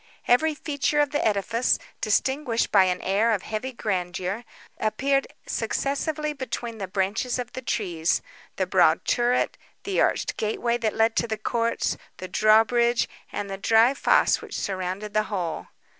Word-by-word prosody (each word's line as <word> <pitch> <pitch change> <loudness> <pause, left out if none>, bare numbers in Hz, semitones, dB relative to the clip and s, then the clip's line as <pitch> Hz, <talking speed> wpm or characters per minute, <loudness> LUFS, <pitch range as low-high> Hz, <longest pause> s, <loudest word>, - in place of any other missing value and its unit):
Every 305 +6 +3
feature 295 0 -1
of 290 -1 +2
the 295 - 0
edifice, 220 +4 +1 0.2
distinguished 255 +2 +1
by 195 -2 +6
an 180 -1 -1
air 210 +4 +2
of 200 - -2
heavy 220 +5 -4
grandeur, 190 -1 -3 0.3
appeared 275 +5 +1 0.2
successively 300 +2 -2
between 235 -4 -5
the 195 - -3
branches 200 +6 -1
of 245 -1 -5
the 260 - -5
trees—the 195 - -2
broad - - +3
turret, 245 +1 +1 0.2
the 395 - 0
arched - - 0
gateway 235 +2 0
that 225 -3 -1
led 225 +1 +3
into 230 - 0
the 220 -1 -2
courts, 230 +2 -1 0.2
the 185 - -6
drawbridge, 225 +4 +3 0.2
and 205 - -4
the 195 0 -6
dry 225 +5 +4
fossé - - +3
which - - -6
surrounded 190 +2 -3
the 215 0 +2
whole. 180 -6 -3
225 Hz, 150 wpm, -25 LUFS, 200-255 Hz, 0.3 s, by